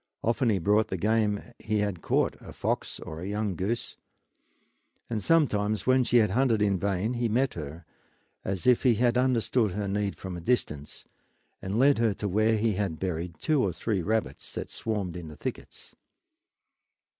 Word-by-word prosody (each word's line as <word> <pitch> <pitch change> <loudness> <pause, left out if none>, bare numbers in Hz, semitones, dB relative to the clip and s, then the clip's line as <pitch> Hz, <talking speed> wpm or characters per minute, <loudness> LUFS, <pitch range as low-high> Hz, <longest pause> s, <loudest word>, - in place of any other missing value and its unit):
Often 115 +2 +2
he 105 - +3
brought 105 +5 +2
the 95 - -3
game 105 +1 +1 0.2
he 110 0 -1
had 100 -5 -2
caught, - - +1
a - - -10
fox - - -2
or 80 +1 -7
a 90 - -5
young 105 -1 -1
goose; 105 +8 -3 1.1
and 110 -2 -1
sometimes 110 -8 +2
when 130 0 +4
she 120 - +3
had 105 -4 +4
hunted 120 0 +2
in 100 -3 +2
vain 100 +4 0
he 120 -1 0
met 130 +4 +1
her, 80 +1 -7 0.6
as 95 -2 -3
if 125 -2 +5
he 125 -4 +4
had 120 +2 +2
understood 120 -4 +2
her 100 +1 -2
need 100 0 -1
from 95 -2 -7
a 85 - -6
distance, 75 - -1 0.6
and 95 +3 -3
led 135 0 +5
her 115 -4 +2
to 105 - -3
where 110 +3 +2
he 110 0 +1
had 95 -5 -2
buried 85 -2 -3
two 150 - +1
or 95 - +1
three 105 +1 -1
of 85 - -4
the - - -4
rabbits 110 0 -1
that - - -5
swarmed 100 -6 -3
in 85 -2 -7
the 75 - -10
thickets. - - -7
105 Hz, 190 wpm, -28 LUFS, 95-115 Hz, 1.1 s, if